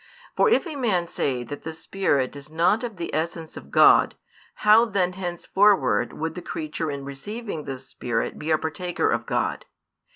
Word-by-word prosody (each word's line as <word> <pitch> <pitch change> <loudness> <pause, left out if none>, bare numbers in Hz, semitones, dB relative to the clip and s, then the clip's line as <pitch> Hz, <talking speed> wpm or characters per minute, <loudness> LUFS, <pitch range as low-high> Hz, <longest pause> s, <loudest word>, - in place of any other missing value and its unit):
For - - +4
if 445 - +3
a 320 -3 -6
man 205 -10 0
say 130 -6 -2
that 140 +5 -7
the 160 0 -6
Spirit 150 -7 0
is 140 +1 -10
not 175 +8 +2
of 235 -3 -4
the 170 -2 -5
essence 160 +1 -3
of - - -10
God, - - +6 0.5
how 215 +2 +8
then 190 -5 0
henceforward 180 - +2
would 160 +1 -4
the 180 - -7
creature 155 -1 -4
in 140 -1 -5
receiving 165 - -6
the 135 -1 -4
Spirit 130 -2 -3
be 155 - -5
a 155 - +4
partaker 175 +3 -1
of - - -1
God? - - -1
165 Hz, 175 wpm, -24 LUFS, 145-195 Hz, 0.5 s, how